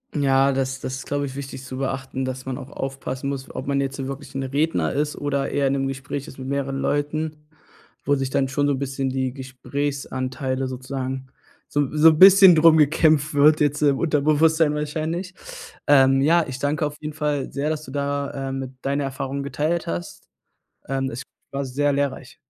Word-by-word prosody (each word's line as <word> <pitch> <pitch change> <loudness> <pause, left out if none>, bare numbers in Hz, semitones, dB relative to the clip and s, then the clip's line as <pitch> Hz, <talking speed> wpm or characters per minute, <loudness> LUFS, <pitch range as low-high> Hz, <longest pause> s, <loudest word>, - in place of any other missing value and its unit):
Ja, 135 -1 +3
das 135 0 -2
das 130 - -4
ist, 135 - -7
glaube 145 0 -1
ich, 135 -1 -7
wichtig 135 -1 -7
zu 130 0 -7
beachten, 135 0 -3
dass 130 0 -4
man 130 -1 -4
auch 130 - -9
aufpassen 135 0 -5
muss, 135 -1 -6
ob 130 - -6
man 140 -1 +1
jetzt 135 0 -3
so 135 -1 -4
wirklich 135 +1 -7
'n 135 - -2
Redner 135 - 0
ist 150 +1 -1
oder 140 -1 -1
eher 140 -1 +1
in 135 - +1
'nem 135 -1 0
Gespräch 135 +1 -5
ist 135 - -13
mit 130 - -6
mehreren 140 0 -2
Leuten, 150 +2 -1 0.7
wo 145 - +3
sich 135 -1 -2
dann 135 0 +1
schon 145 +2 0
so 145 - +2
'n 130 - -3
bisschen 135 -1 -2
die 130 -1 -2
Gesprächsanteile 130 0 -3
sozusagen 130 0 -5 0.4
so 145 - 0
'n 140 - -1
so 160 +2 +8
'n 155 -1 +1
bisschen 190 -1 +9
drum 160 0 +6
gekämpft 155 0 +3
wird, 150 +2 +5
jetzt 145 0 +1
im 140 -2 +3
Unterbewusstsein 155 0 +3
wahrscheinlich. 160 +5 -3 0.5
Ähm, 135 -1 +5
ja, 165 +3 +4
ich 130 -1 -6
danke 150 +3 0
auf 150 0 -4
jeden 150 0 -5
Fall 150 -3 -2
sehr, 140 +2 -2
dass 155 -1 -3
du 130 - -10
da, 140 -1 -2
äh, - - -3
mit 135 -1 -4
deine 140 +1 0
Erfahrungen 135 +1 -4
geteilt 150 +5 -1
hast. 85 +1 -5 0.7
Ähm, 135 0 -1
es 120 +2 -6 0.3
war 140 0 -2
sehr 145 +3 0
lehrreich. 140 -1 -2
140 Hz, 200 wpm, -23 LUFS, 135-150 Hz, 0.7 s, bisschen